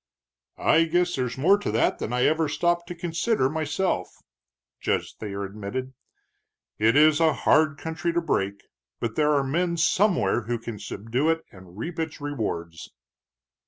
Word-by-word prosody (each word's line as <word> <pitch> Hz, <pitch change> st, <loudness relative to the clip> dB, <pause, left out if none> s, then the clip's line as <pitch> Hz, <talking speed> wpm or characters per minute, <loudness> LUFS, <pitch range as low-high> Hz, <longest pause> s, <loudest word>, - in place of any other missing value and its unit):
"I 165 Hz, +1 st, +4 dB
guess 175 Hz, +2 st, +1 dB
there's 125 Hz, -2 st, -2 dB
more 190 Hz, +9 st, +4 dB
to -, -, -3 dB
that 115 Hz, +2 st, +1 dB
than -, -, -4 dB
I 125 Hz, 0 st, +1 dB
ever 155 Hz, 0 st, +2 dB
stopped 175 Hz, 0 st, 0 dB
to 175 Hz, -, -6 dB
consider 170 Hz, -, 0 dB
myself," 155 Hz, -, -1 dB, 0.7 s
Judge -, -, -1 dB
Thayer 100 Hz, -2 st, -5 dB
admitted. 105 Hz, +6 st, -5 dB, 0.9 s
"It 110 Hz, +2 st, +4 dB
is 155 Hz, +1 st, +6 dB
a 160 Hz, -1 st, +4 dB
hard 155 Hz, -1 st, +3 dB
country 160 Hz, +2 st, -3 dB
to 170 Hz, -, +2 dB
break, 100 Hz, -11 st, -1 dB, 0.4 s
but 115 Hz, -2 st, -3 dB
there 150 Hz, -1 st, +3 dB
are 140 Hz, -, +2 dB
men 170 Hz, +5 st, 0 dB
somewhere 170 Hz, -, +2 dB
who 120 Hz, 0 st, 0 dB
can 115 Hz, -2 st, -7 dB
subdue 115 Hz, +9 st, -2 dB
it 165 Hz, 0 st, +1 dB
and 95 Hz, -1 st, -15 dB
reap 165 Hz, +9 st, -5 dB
its 160 Hz, -1 st, -3 dB
rewards." 90 Hz, -, -4 dB
145 Hz, 160 wpm, -25 LUFS, 115-165 Hz, 0.9 s, is